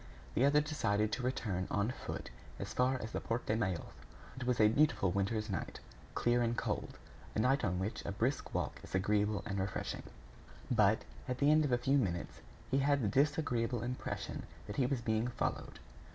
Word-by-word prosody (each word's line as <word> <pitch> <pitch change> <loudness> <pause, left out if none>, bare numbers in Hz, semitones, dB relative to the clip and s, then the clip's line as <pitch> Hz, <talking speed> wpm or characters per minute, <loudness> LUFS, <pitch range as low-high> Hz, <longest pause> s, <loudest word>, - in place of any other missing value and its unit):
The 130 - +4
other 145 +1 +5
decided 110 -9 0
to 125 - -1
return 105 -7 -1
on 100 +3 +1
foot - - -6 0.3
as - - -5
far 130 +1 +2
as 110 - -5
the - - -2
Porte 115 -1 -1
Maillot. 95 -7 -2 0.4
It 130 - -5
was 125 -1 +2
a 110 - +7
beautiful 115 -6 +3
winter's 105 +3 0
night, 95 -6 -4 0.4
clear 120 0 +3
and 120 0 +1
cold; - - -2 0.4
a - - +1
night 130 +5 +3
on 90 -5 +1
which 95 +4 -3
a - - -3
brisk 120 +8 -1
walk - - -1
is - - -6
agreeable 105 +2 +2
and 100 -1 -2
refreshing. 95 +2 -2 0.7
But, - - +4 0.2
at 125 - -1
the 145 +2 +4
end 155 0 +5
of 140 - -1
a 125 - +4
few 135 +3 +3
minutes, 85 -7 -2 0.3
he 135 - +3
had 140 -1 +3
the - - +2
disagreeable 130 - +1
impression 125 +1 -4 0.2
that 105 +1 -6
he 130 - +3
was 130 -2 -1
being 110 0 +1
followed. 125 - -3
115 Hz, 190 wpm, -35 LUFS, 105-130 Hz, 0.7 s, a